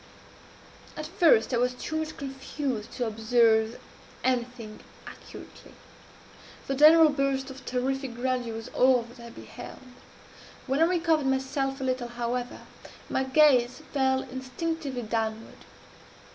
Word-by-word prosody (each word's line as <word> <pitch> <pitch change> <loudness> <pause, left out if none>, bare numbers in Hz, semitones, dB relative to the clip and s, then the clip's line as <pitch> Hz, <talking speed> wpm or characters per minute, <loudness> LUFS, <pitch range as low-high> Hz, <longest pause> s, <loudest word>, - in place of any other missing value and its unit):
"At 305 - -4
first 315 - +3
I - - +3
was 250 +1 +1
too 315 +5 -4
much 315 0 -4
confused 270 -4 -4
to 245 - -2
observe 225 0 +2 0.4
anything 245 -3 -2 0.3
accurately. - - -12 0.9
The 275 - -2
general 310 +3 +7
burst 275 -1 -1
of 265 0 -11
terrific 260 0 -2
grandeur 245 -2 -2
was 225 +2 -7
all 255 -2 +3
that 240 +2 -15
I 235 0 -10
beheld. - - -10 0.9
When 270 +2 0
I - - +7
recovered 330 -4 +1
myself 270 +1 -1
a - - -4
little, 255 -2 -1
however, 240 +1 -4 0.5
my 265 - +1
gaze 265 -1 +4
fell 265 -1 +2
instinctively 260 +1 -4
downward. 220 0 -4
260 Hz, 125 wpm, -27 LUFS, 240-275 Hz, 0.9 s, general